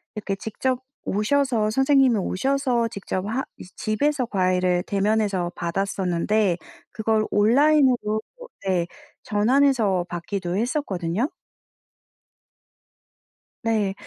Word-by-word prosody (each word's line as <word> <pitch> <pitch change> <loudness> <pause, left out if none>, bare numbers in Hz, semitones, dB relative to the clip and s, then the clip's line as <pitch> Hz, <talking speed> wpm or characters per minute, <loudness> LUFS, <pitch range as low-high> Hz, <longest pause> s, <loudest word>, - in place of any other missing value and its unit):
이렇게 205 -2 -3
직접 245 +5 -2 0.3
오셔서 220 0 +1
선생님이 270 -1 +4
오셔서 250 +4 0
직접 195 -2 -4
하 235 +6 -1
이제 180 - -12
집에서 270 +5 0
과외를 185 -3 +1
대면해서 200 -3 0
받았었는데 185 +2 0 0.3
그걸 220 0 0
온라인으로 245 -1 +3 0.5
네 180 -2 +1 0.4
전환해서 220 -4 +2
받기도 175 +1 -4
했었거든요. 220 - -1 2.3
네. 215 -4 +1
215 Hz, 240 characters per minute, -24 LUFS, 190-255 Hz, 2.3 s, 선생님이